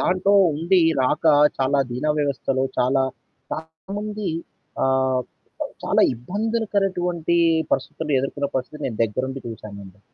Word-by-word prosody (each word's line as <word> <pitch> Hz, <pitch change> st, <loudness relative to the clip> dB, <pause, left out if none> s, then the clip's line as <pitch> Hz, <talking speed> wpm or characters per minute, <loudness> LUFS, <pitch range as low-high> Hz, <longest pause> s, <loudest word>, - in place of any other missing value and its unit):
దాంటో 185 Hz, +2 st, +2 dB, 0.2 s
ఉండి 170 Hz, +5 st, +2 dB, 0.2 s
రాక 130 Hz, +5 st, 0 dB, 0.3 s
చాలా 135 Hz, +1 st, +2 dB
ధీనా 130 Hz, +5 st, -1 dB
వ్యవస్థలో 135 Hz, -2 st, 0 dB
చాలా, 135 Hz, +2 st, +3 dB, 0.5 s
చాలా 160 Hz, +4 st, -8 dB
మంది. 210 Hz, -2 st, -3 dB, 0.5 s
ఆహ్, 130 Hz, -1 st, +2 dB, 0.4 s
ప్ -, -, -2 dB, 0.2 s
చాలా -, -, +3 dB
ఇబ్బందులకరటువంటి 185 Hz, -, -1 dB, 0.3 s
పరిస్థితుల్లో 150 Hz, +2 st, -1 dB
ఎదుర్కొన్న 140 Hz, +1 st, -2 dB
పరిస్థితి 145 Hz, +4 st, -5 dB
నేను 115 Hz, -4 st, -5 dB
దగ్గరుండి 130 Hz, +5 st, -3 dB
చూసానండి. 100 Hz, -3 st, -10 dB
145 Hz, 110 wpm, -23 LUFS, 130-180 Hz, 0.5 s, చాలా